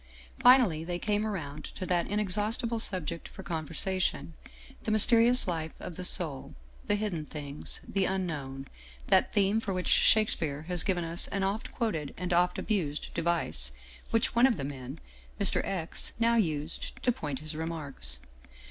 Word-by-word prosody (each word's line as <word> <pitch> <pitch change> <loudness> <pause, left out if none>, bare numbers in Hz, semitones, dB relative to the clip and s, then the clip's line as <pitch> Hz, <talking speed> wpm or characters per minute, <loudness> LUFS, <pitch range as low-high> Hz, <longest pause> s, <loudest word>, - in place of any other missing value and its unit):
Finally 245 -11 +5
they 175 +1 -3
came 210 +3 -1
around 150 -8 -5
to 185 - -7
that 175 -1 0
in 205 +1 -1
exhaustible 215 +3 0
subject 170 -6 -1
for - - -11
conversation, 165 +2 -1 0.5
the - - -4
mysterious 230 +3 +6
life 160 -3 -3
of - - -7
the 180 - -4
soul, 160 -7 +1 0.3
the 205 - +2
hidden 205 -7 -2
things, 145 -1 -6
the 195 -1 0
Unknown, 145 -8 -3 0.4
that - - +4
theme 205 +2 +2
for 205 -3 -3
which 180 - -2
Shakespeare 160 -9 +3
has 175 0 0
given 180 -2 0
us 165 +1 +2
an 195 0 -2
oft 200 +3 -2
quoted 165 - -3
and 180 -1 -2
oft 180 +1 +2
abused 165 -9 -2
device, 165 - -1 0.4
which 225 0 +1
one 240 +3 +6
of 235 -6 0
the - - -4
men, 135 +1 -7 0.4
Mr. 200 -2 +3
X., 175 -4 -3
now 230 0 +3
used 160 -7 -1
to 250 - +3
point 150 - -4
his 155 +3 -5
remarks. 150 - -4
175 Hz, 160 wpm, -29 LUFS, 155-205 Hz, 0.5 s, mysterious